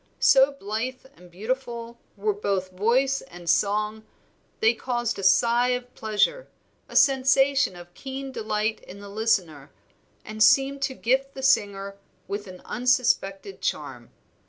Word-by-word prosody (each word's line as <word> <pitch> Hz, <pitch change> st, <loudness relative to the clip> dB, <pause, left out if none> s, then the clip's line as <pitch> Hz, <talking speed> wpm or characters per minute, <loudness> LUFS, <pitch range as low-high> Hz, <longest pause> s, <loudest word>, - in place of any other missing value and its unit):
So 270 Hz, +1 st, +5 dB
blithe 250 Hz, +2 st, -5 dB
and 180 Hz, +1 st, -17 dB
beautiful 235 Hz, +4 st, -5 dB, 0.2 s
were 210 Hz, +1 st, 0 dB
both 195 Hz, -2 st, -2 dB
voice 250 Hz, +8 st, +1 dB
and 175 Hz, 0 st, -13 dB
song 210 Hz, +3 st, +1 dB, 0.6 s
they 225 Hz, +1 st, +4 dB
caused 240 Hz, -1 st, -2 dB
a -, -, -5 dB
sigh 235 Hz, +5 st, +4 dB
of 250 Hz, 0 st, -5 dB
pleasure, 220 Hz, -, 0 dB, 0.4 s
a -, -, -11 dB
sensation 270 Hz, -3 st, +4 dB
of 175 Hz, 0 st, -13 dB
keen 270 Hz, +3 st, -7 dB
delight 215 Hz, -2 st, -2 dB
in 195 Hz, -, -12 dB
the 200 Hz, 0 st, -10 dB
listener, 185 Hz, -9 st, -1 dB, 0.6 s
and 215 Hz, 0 st, -7 dB
seemed 275 Hz, +3 st, +4 dB
to 265 Hz, -, -1 dB
gift 270 Hz, +3 st, 0 dB
the 265 Hz, -, -7 dB
singer 200 Hz, -6 st, +1 dB, 0.3 s
with 205 Hz, +1 st, -5 dB
an 185 Hz, -1 st, -12 dB
unsuspected 250 Hz, -, 0 dB
charm. -, -, -4 dB
225 Hz, 135 wpm, -25 LUFS, 200-265 Hz, 0.6 s, So